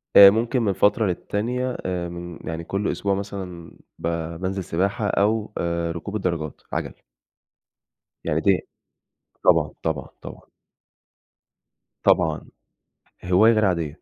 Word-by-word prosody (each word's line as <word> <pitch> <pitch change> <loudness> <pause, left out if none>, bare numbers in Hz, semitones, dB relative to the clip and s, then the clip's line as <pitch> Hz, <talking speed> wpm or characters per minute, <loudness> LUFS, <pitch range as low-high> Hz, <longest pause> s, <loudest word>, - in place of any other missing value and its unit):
آآ، 100 -1 +12
ممكن 115 +4 +1
من 100 -3 +1
فترة 105 +3 +3
للتانية 120 +8 -2
آآ 90 -2 -2
من 85 -1 -8
يعني 80 +1 -4
كل 100 +4 -1
أسبوع 100 -1 -1
مثلًا 95 -4 -6 0.3
ب 85 - -2 0.3
بانزل 95 0 -2
سِباحة 100 +5 -1
أو 105 +2 +1
آآ، 85 -1 -1
ركوب 95 +5 -6
الدراجات، 85 -6 -2
عَجَل. - - -2 1.3
يعني 80 +1 0
دي 95 -2 +2 0.8
طبعًا، - - +4
طبعًا، 80 -5 -2
طبعًا. - - -11 1.5
طبعًا. - - +2 0.8
هواية 100 +6 +5
غير 110 -1 +3
عادية. 85 -4 -1
95 Hz, 120 wpm, -23 LUFS, 85-105 Hz, 1.5 s, آآ